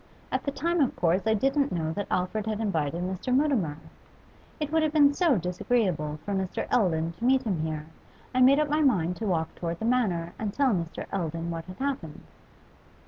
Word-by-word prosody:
At - - -1
the 280 - 0
time 340 +4 0
of 265 - +1
course 180 +4 +1
I 220 - +4
didn't 275 +5 +1
know 160 -2 -1
that 205 +3 -3
Alfred 185 +4 -1
had 215 -1 -2
invited 170 -6 -1
Mr. 190 +7 -3
Mutimer. 250 - +2 0.8
It 300 -1 -3
would 320 0 +3
have 310 -1 +1
been 290 -2 +5
so 315 - +3
disagreeable 180 -4 0
for 205 - -2
Mr. 190 -2 -2
Eldon 165 -7 +2
to - - -7
meet 260 +1 +4
him 195 -8 -1
here, 155 -1 -3 0.5
I 255 - +2
made 265 +2 +7
up 305 - +2
my 300 +2 +1
mind 180 - +2
to 220 - -3
walk 160 -4 0
towards 170 -1 -4
the 220 - -4
Manor 195 -9 +1
and 215 -2 -2
tell 275 -4 +3
Mr. 170 -3 -3
Eldon 165 -2 -2
what 165 -1 -5
had 185 +1 -10
happened. 265 - -4
200 Hz, 200 wpm, -27 LUFS, 170-265 Hz, 0.8 s, made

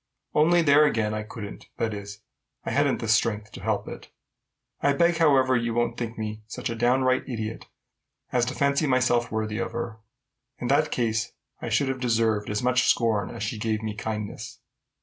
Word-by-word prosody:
Only 170 +3 +4
there 145 0 +6
again, 115 -7 +1
I 110 - -2
couldn't, 105 -1 -8
that 110 -1 -1
is, 100 0 -8 0.4
I - - -2
hadn't - - +2
the - - -3
strength 105 -1 +1
to - - -10
help - - -1
it. - - -9 0.7
I 140 - +3
beg, 170 +3 +3
however, 135 -5 +4
you 115 -1 0
won't 120 0 +1
think 115 -1 -5
me 110 0 -4
such 110 - -4
a - - -3
downright 130 +3 +2
idiot 110 -2 -5 0.6
as 125 -1 +2
to 130 +2 -4
fancy 140 +2 +2
myself 125 -2 +2
worthy 110 0 -2
of - - -3
her. 115 -1 -4 0.6
In 120 - -4
that 145 +3 +3
case, 115 -1 -1 0.3
I 120 - -4
should 115 +5 +2
have 135 -1 -2
deserved 115 -4 +1
as 105 +3 -2
much 125 0 +3
scorn 110 -5 +2
as - - -6
she 110 0 -3
gave 110 0 -1
me 110 -1 -3
kindness. 105 0 -5
115 Hz, 190 wpm, -26 LUFS, 110-130 Hz, 0.7 s, there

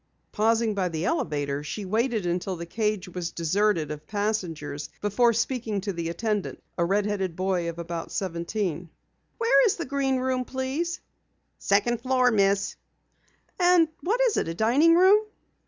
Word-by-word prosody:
Pausing 225 +1 +2
by 190 -3 0
the 165 +1 -3
elevator, 145 - -1
she 195 +7 -5
waited 220 +1 0
until 180 +2 -1
the 170 0 -6
cage 210 +1 -1
was 180 -1 -4
deserted 170 -2 +1
of 150 0 -8
passengers 180 -9 -3
before 220 +4 +3
speaking 230 -2 -1
to 200 0 -3
the 165 -1 -3
attendant, 210 +3 -2 0.2
a 170 - +1
red 200 +4 +1
headed 195 -4 -2
boy 185 -2 0
of 170 - -7
about 170 -1 -5
seventeen. 175 -2 -3 0.5
"Where 465 +1 +4
is 410 - +1
the 340 - -4
Green 270 -1 0
Room, 255 0 0
please?" 270 +8 -3 0.6
"Second 220 +4 +1
floor, 255 0 +3
Miss." 200 -2 +1 0.8
"And 350 -2 +5
what 440 +7 0
is - - +3
it? - - 0
A 165 - -4
dining 275 - +4
room?" 380 +4 +6
205 Hz, 155 wpm, -26 LUFS, 175-255 Hz, 0.8 s, room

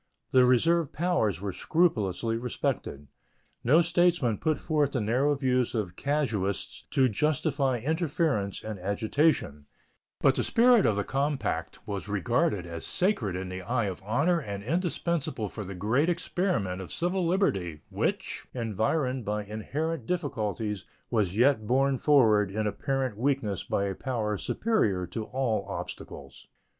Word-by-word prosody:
The 130 -1 +6
reserved 160 +5 +3
powers 155 - +1
were 100 -2 -3
scrupulously 115 - +1
respected. 115 - -3 0.6
No 155 +8 +5
statesman 170 - +2
put 155 -1 +1
forth 150 -3 0
the 130 - +1
narrow 125 +7 +2
views 130 -3 +1
of 95 -6 -2
casuists 115 -10 -1
to 130 -1 +3
justify 140 +2 +1
interference 145 - -1
and 110 -3 -5
agitation, 100 - 0 0.5
but - - +4
the - - 0
spirit 235 -2 +5
of 110 - +2
the 100 - 0
compact 140 +5 -2
was 100 -1 -4
regarded 105 - 0
as 85 -1 -6
sacred 175 - 0
in 90 0 -4
the 95 0 -5
eye 115 +4 0
of 95 -2 -4
honor 145 - +2
and 100 -8 -6
indispensable 165 - -1
for 105 - -6
the 95 0 -7
great 115 - +1
experiment 170 - -1
of 95 - -8
civil 180 +2 -1
liberty, 100 - 0
which, - - -2
environed 125 +4 0
by 105 0 -2
inherent 135 +7 -3
difficulties, 110 - -2 0.3
was 105 -5 +1
yet 120 -3 +3
borne 135 +2 +2
forward 110 -9 +4
in 105 +2 -2
apparent 130 +1 -1
weakness 125 -7 0
by 100 - -1
a 100 -1 -1
power 110 -1 -2
superior 105 - 0
to 105 +5 -5
all 120 -6 -1
obstacles. 70 -7 -8
120 Hz, 140 wpm, -28 LUFS, 100-150 Hz, 0.6 s, The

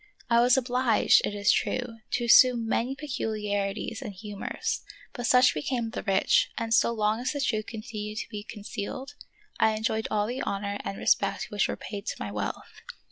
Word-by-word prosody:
I 235 - +6
was 245 +2 +5
obliged, 250 -2 +3
it 205 - -2
is 205 0 +3
true, 245 -3 -1
to 240 - +1
assume 235 -1 +6
many 245 +4 0
peculiari 210 -8 -2
ties 225 - -8
and 210 - -5
humors; 205 +1 -4 0.3
but 245 -2 -3
such 250 0 +6
became 230 - -2
the - - -4
rich, 195 -2 +3
and 230 -1 -1
so 235 -1 +4
long 215 -1 0
as 250 +4 -2
the 285 - -3
truth 215 -4 -1
continued 215 -2 -6
to - - -4
be 210 -2 -5
concealed 225 +6 -6 0.5
I 220 0 +4
enjoyed 220 0 -1
all 210 -1 +1
the 245 +4 -3
honor 200 0 -3
and 195 - -5
respect 200 - +1
which 205 -1 +1
were - - -4
paid 200 -2 -7
to - - -2
my 105 - -4
wealth. 105 0 -5
220 Hz, 190 wpm, -27 LUFS, 205-245 Hz, 0.5 s, I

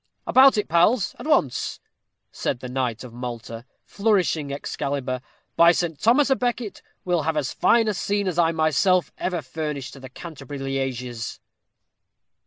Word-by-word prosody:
"About 260 -2 +6
it, 210 - 0
pals, 180 +6 +3
at - - -7
once," 145 - +1 0.5
said - - -2
the 125 - -7
knight 125 -3 -2
of 125 -2 -10
Malta, 120 -1 -7 0.2
flourishing 185 -9 +1
Excalibur. 140 -2 -3 0.3
"By 170 0 +7
St. 165 -4 -2
Thomas 265 +5 +4
à 265 - +3
Becket, 240 -3 -2 0.2
we'll 175 -2 +1
have 155 +1 -1
as 145 -3 -1
fine 230 -1 +3
a 215 - +1
scene 200 +2 -1
as 175 -2 -1
I 165 -1 +4
myself 160 +2 +2
ever 175 -4 -2
furnished 145 0 -5
to 140 - -11
the 130 -1 -10
Canterbury 145 -2 -9
lieges." 130 -4 -3
155 Hz, 155 wpm, -24 LUFS, 130-190 Hz, 0.5 s, By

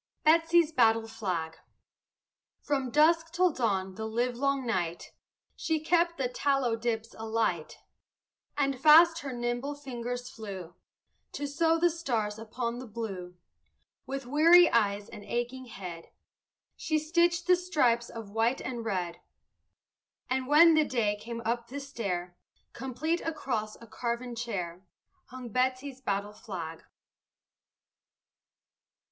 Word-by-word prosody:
BETSY'S 330 0 +4
BATTLE 225 -5 +3
FLAG 180 -8 -3 1.1
From 270 -3 -1
dusk 320 +4 +3
till 360 +1 +3
dawn 195 -8 -1
the 220 +3 -5
livelong 250 +4 0
night 175 -7 -2 0.4
She 320 -2 -1
kept 340 +2 +2
the 265 - 0
tallow 265 -2 +1
dips 225 -1 -3
alight, 225 0 -1 0.8
And 275 -2 0
fast 325 +2 +7
her 280 -4 -5
nimble 240 +3 -2
fingers 245 -3 -5
flew 195 -8 -8 0.6
To 290 - -3
sew 325 +3 +2
the 345 +1 +3
stars 225 -10 -2
upon 235 +2 -4
the 255 - -8
blue. 195 -5 -6 0.7
With 270 0 -4
weary 330 +6 +6
eyes 205 -2 +1
and 210 -3 -10
aching 245 +3 -3
head 180 -7 -8 0.7
She 310 - -1
stitched 340 +3 +2
the 360 - +6
stripes 275 -10 +1
of 225 -3 -8
white 225 +4 +1
and 240 -3 -5
red, 185 -6 -3 1.1
And 260 0 0
when 325 +4 +7
the 310 0 +5
day 230 -7 0
came 230 +2 -7
up 235 +1 -1
the 280 +4 -6
stair 190 -10 -4 0.4
Complete 280 +7 -2
across 245 -9 -3
a 230 - -12
carven 235 +2 -4
chair 190 -7 -4 0.4
Hung 255 -1 -9
Betsy's 255 +3 -1
battle 200 -3 -2
flag. 170 -7 -7
245 Hz, 125 wpm, -29 LUFS, 220-290 Hz, 1.1 s, fast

